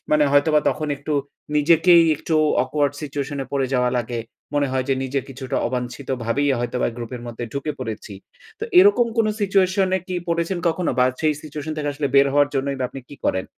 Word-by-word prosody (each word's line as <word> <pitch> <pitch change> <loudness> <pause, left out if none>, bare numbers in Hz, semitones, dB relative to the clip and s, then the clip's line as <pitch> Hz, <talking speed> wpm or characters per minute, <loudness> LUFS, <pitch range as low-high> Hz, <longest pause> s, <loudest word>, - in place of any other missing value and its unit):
মানে 150 -1 +4
হয়তোবা 150 +2 +4
তখন 155 0 -2
একটু 145 +2 -5 0.4
নিজেকেই 165 +3 +6
একটু 160 - -3 0.3
awkward 145 +1 0
situation 145 -1 -4
এ - - -6
পরে 135 -1 +1
যাওয়া 125 -1 +2
লাগে। 120 0 -3 0.3
মনে 145 -1 +2
হয় 130 -1 0
যে 135 - +3
নিজে 135 +1 -1
কিছুটা 130 -1 -5
অবাঞ্ছিত 125 +2 -4 0.2
ভাবেই 140 +6 +1
হয়তোবা 120 +1 -1
গ্রুপের 120 0 -6
মধ্যে 120 0 -5
ঢুকে 140 +2 -3
পরেছি। 110 -3 -6 0.5
তো - - -2
এরকম 365 -11 +6
কোন 225 - +4
situation 190 -1 +2
এ - - -1
কি 185 - -3
পরেছেন 170 +2 0
কখনো? 170 +1 0
বা 125 - +5 0.2
সেই 155 -1 +2
situation 155 0 -6
থেকে 150 -1 -2
আসলে 145 0 -2
বের 140 0 +6
হওয়ার 145 0 +4
জন্যই 140 0 -1
বা 130 - -1
আপনি 135 - -9
কি - - -10
করেন? 95 - 0
145 Hz, 195 wpm, -22 LUFS, 130-155 Hz, 0.5 s, নিজেকেই